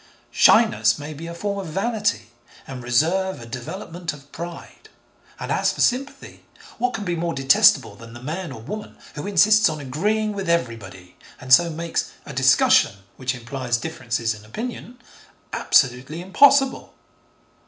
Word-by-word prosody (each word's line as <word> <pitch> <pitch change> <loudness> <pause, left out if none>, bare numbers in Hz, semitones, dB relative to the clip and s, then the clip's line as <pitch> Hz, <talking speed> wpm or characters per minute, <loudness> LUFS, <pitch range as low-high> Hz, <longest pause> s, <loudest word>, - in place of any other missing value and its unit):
Shyness 115 +2 +4
may 150 +1 -7
be 160 +3 -8
a 170 - -7
form 200 +3 -3
of 190 - -6
vanity, 215 - -1 0.3
and 130 -2 -8
reserve 165 +10 0
a 115 - -10
development 165 - -6
of 140 -1 -16
pride, 170 0 -9 0.5
and - - -5
as - - +1
for - - -4
sympathy, 265 +3 -2 0.4
what 250 +1 0
can 205 - -5
be 175 -2 -1
more 170 0 -2
detestable 135 -5 +4
than 115 +2 -13
the 120 - -10
man, 165 +3 -5
or 115 -4 -9
woman, 210 - -8 0.2
who 150 +6 -6
insists 210 +2 +5
on 155 -1 -5
agreeing 210 +11 -1
with 195 -3 -4
everybody, 105 - -3 0.2
and 130 +1 +1
so 170 +4 +6
makes 165 +1 -3
'a - - -8
discussion, - - +4 0.2
which 130 0 -2
implies 125 0 -3
differences 115 -5 -3
in 105 -1 -13
opinion,' 235 - -7 0.6
absolutely 135 +4 +1
impossible? 270 +9 +3
160 Hz, 155 wpm, -22 LUFS, 125-195 Hz, 0.6 s, so